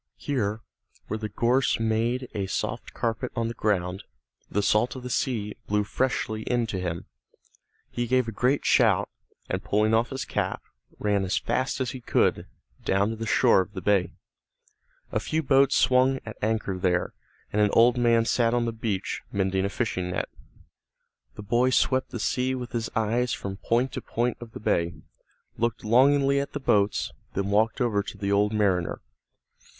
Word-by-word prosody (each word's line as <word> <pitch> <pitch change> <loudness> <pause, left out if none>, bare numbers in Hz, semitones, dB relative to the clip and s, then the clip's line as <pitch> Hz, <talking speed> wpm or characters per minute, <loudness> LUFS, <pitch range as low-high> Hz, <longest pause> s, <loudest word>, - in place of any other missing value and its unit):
Here, 110 -6 -2 0.5
where 110 - -2
the 110 -1 -4
gorse 120 +5 +2
made 115 +3 0
a 100 -3 -2
soft - - -3
carpet 115 +2 -2
on 115 -2 -1
the - - -4
ground, 95 -3 -1 0.5
the 100 +3 0
salt 110 +6 +2
of 130 - -8
the 125 - -5
sea 110 -6 -1
blew 105 0 +1
freshly 110 -1 -1
in 120 -1 +1
to 95 - -1
him. 85 -2 -4 0.9
He 120 0 -2
gave 130 0 +2
a - - -3
great 125 +6 +1
shout, - - +4 0.4
and - - -3
pulling 105 +2 +2
off 115 +2 +2
his 135 -1 -4
cap, - - -2 0.3
ran 100 -2 +1
as 95 - 0
fast 130 +1 -1
as 130 -2 -1
he 130 - -8
could, - - +1 0.4
down 100 +3 +1
to - - -4
the 115 0 -5
shore 95 - +5
of 95 +2 -7
the - - -5
bay. 95 -4 +2 1.0
A - - 0
few 160 +1 -1
boats 135 0 +4
swung 130 +1 +4
at 110 - -7
anchor 105 -3 -1
there, 90 -1 0 0.4
and 105 - +2
an 105 - +4
old 120 +1 +6
man 115 -2 +3
sat 115 0 +2
on 120 -1 +1
the 115 - -1
beach, 110 -4 -3
mending 95 -1 0
a - - 0
fishing 95 -4 -2
net. 90 - -2 1.1
The 105 - -8
boy 120 +5 +2
swept 130 0 +2
the 120 - -6
sea 130 +4 0
with 125 -1 -6
his 115 -1 -2
eyes 115 +2 +1
from 95 -1 -5
point 120 +5 0
to - - -5
point 120 +1 -1
of 115 -2 -10
the - - -7
bay, 85 -5 0 0.6
looked 115 -1 -1
longingly 140 +4 +4
at 140 - -4
the 145 - -3
boats, 105 -6 +1 0.2
then 100 +1 -1
walked 110 +3 +2
over 115 -5 +1
to 100 - -8
the 100 -1 -2
old 105 +1 +3
mariner. 100 -5 +1
115 Hz, 180 wpm, -26 LUFS, 100-125 Hz, 1.1 s, old